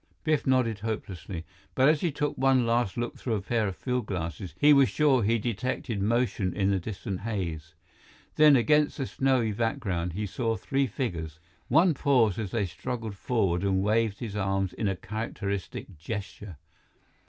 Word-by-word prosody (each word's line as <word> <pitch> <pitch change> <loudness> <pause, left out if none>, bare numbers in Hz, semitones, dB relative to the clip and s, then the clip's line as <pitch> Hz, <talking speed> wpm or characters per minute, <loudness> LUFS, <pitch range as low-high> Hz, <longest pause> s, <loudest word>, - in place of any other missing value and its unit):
Biff 155 -3 +1
nodded 125 -5 +2
hopelessly. 95 -5 -5 0.3
But 130 - +4
as 155 -1 +3
he 175 - +1
took 145 +1 -2
one 130 -2 +3
last 115 -3 +1
look 120 0 -3
through 115 -3 -1
a 100 - -2
pair 110 0 0
of 95 - -4
field 125 -1 -2
glasses, 85 -1 -4
he 150 0 +7
was 140 -2 +5
sure 145 -5 +3
he 115 +2 +2
detected 115 -1 -2
motion 110 -3 0
in 100 -1 +2
the 95 - +1
distant 95 0 -5
haze. 85 -7 -4 0.6
Then, 150 -2 +7
against 150 +5 +3
the 135 - -2
snowy 130 -4 +1
background, 95 -6 -2
he 105 +4 -2
saw 115 +3 -1
three 135 +5 0
figures. 85 - -4 0.3
One 160 +6 +4
paused 125 - +2
as 105 -4 -3
they 105 0 0
struggled 110 +5 -5
forward 95 -5 0
and 95 -1 +1
waved 110 0 +1
his 110 -3 -6
arms 95 -2 0
in 105 - -2
a 95 - 0
characteristic 100 -4 -5
gesture. 100 -1 -6
110 Hz, 170 wpm, -28 LUFS, 95-125 Hz, 0.6 s, he